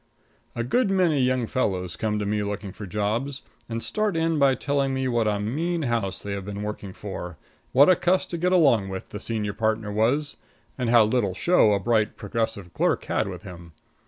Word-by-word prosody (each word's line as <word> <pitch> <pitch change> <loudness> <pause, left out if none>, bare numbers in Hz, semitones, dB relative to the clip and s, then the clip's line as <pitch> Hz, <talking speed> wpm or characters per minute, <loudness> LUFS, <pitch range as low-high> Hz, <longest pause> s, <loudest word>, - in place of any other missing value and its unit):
A 120 - -1
good 215 - +1
many 180 -7 +2
young 125 -1 +1
fellows 95 -8 -1
come 105 -1 -1
to 105 - -2
me 105 +1 0
looking 100 -1 -4
for 100 +2 -8
jobs, 110 +8 -2 0.3
and 115 0 -3
start 215 -5 -1
in 165 -1 +1
by 135 -2 +4
telling 140 -1 0
me 130 0 -1
what 120 -3 +1
a 105 -1 0
mean 160 +11 -1
house 115 -7 -2
they 100 - -5
have 100 -1 -3
been 100 +1 -5
working 105 -2 -5
for; 90 -4 -7 0.3
what 140 +3 +6
a 185 - +6
cuss 180 +2 +1
to 170 - -5
get 180 +2 +1
along 135 - +4
with 95 0 -6
the 105 - -6
senior 105 -2 -3
partner 110 -1 -1
was; 130 +8 +1 0.4
and 125 -3 -2
how 120 -1 +7
little 105 -4 0
show 170 - +4
a 100 - +1
bright, 110 +1 +1
progressive 100 -4 -3
clerk - - +1
had - - 0
with 90 -2 -7
him. 85 -3 -11
110 Hz, 205 wpm, -25 LUFS, 100-140 Hz, 0.4 s, how